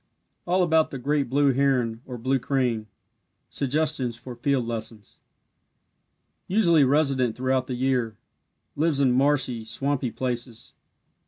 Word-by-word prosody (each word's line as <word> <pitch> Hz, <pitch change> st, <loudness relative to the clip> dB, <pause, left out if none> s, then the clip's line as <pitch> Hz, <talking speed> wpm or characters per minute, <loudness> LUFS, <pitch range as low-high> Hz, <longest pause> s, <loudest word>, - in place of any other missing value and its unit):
ALL 180 Hz, +1 st, +3 dB
ABOUT 160 Hz, -2 st, +3 dB
THE 135 Hz, -, -6 dB
GREAT 140 Hz, 0 st, 0 dB
BLUE 140 Hz, +1 st, +3 dB
HERON 125 Hz, -4 st, +1 dB
OR 125 Hz, -2 st, -6 dB
BLUE 130 Hz, +3 st, 0 dB
CRANE 125 Hz, -4 st, -1 dB, 0.6 s
SUGGESTIONS 140 Hz, -3 st, -1 dB
FOR 120 Hz, +1 st, -9 dB
FIELD 130 Hz, 0 st, 0 dB
LESSONS 110 Hz, -2 st, -6 dB, 1.3 s
Usually 175 Hz, -6 st, +4 dB
resident 135 Hz, -4 st, +2 dB
throughout 130 Hz, 0 st, 0 dB
the 125 Hz, -, -3 dB
year. 125 Hz, -4 st, 0 dB, 0.6 s
Lives 150 Hz, -1 st, +1 dB
in 135 Hz, -3 st, +3 dB
marshy, 130 Hz, -3 st, +1 dB
swampy 130 Hz, +3 st, -1 dB
places. 120 Hz, -1 st, -4 dB
130 Hz, 120 wpm, -25 LUFS, 120-140 Hz, 1.3 s, Usually